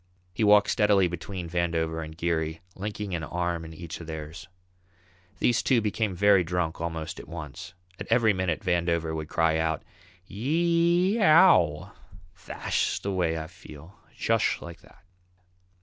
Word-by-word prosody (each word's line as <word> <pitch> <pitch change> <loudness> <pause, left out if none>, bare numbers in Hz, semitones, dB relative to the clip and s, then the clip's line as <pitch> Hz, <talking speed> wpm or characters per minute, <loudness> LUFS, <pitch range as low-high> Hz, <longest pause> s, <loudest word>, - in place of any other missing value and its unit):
He 110 - -1
walked 105 0 +5
steadily 105 -3 +3
between 90 +1 -6
Vandover 80 -1 -1
and 80 0 -10
Geary, 80 -1 -2
linking 105 0 -5
an 85 -2 -2
arm 85 +1 -2
in 80 - -9
each 80 +1 -8
of 80 - -10
theirs. 80 +3 -7 0.9
These 120 -2 +2
two 130 -3 +3
became 105 -2 -1
very 100 0 +4
drunk 85 -1 -2
almost 80 0 -4
at - - -11
once. 85 +2 -8 0.2
At - - -6
every 115 -3 +4
minute 95 -2 -1
Vandover 85 -3 0
would 80 -1 -5
cry 80 -1 +1
out, 80 -1 -1 0.4
"Yee 170 - +1
ee - - -1
ow! 130 - +5 0.4
Thash - - -2
way 90 -5 0
I 80 - -4
feel, 80 0 -13 0.2
jush - - +1
like 85 -1 -10
that." - - -21
85 Hz, 150 wpm, -27 LUFS, 80-105 Hz, 0.9 s, walked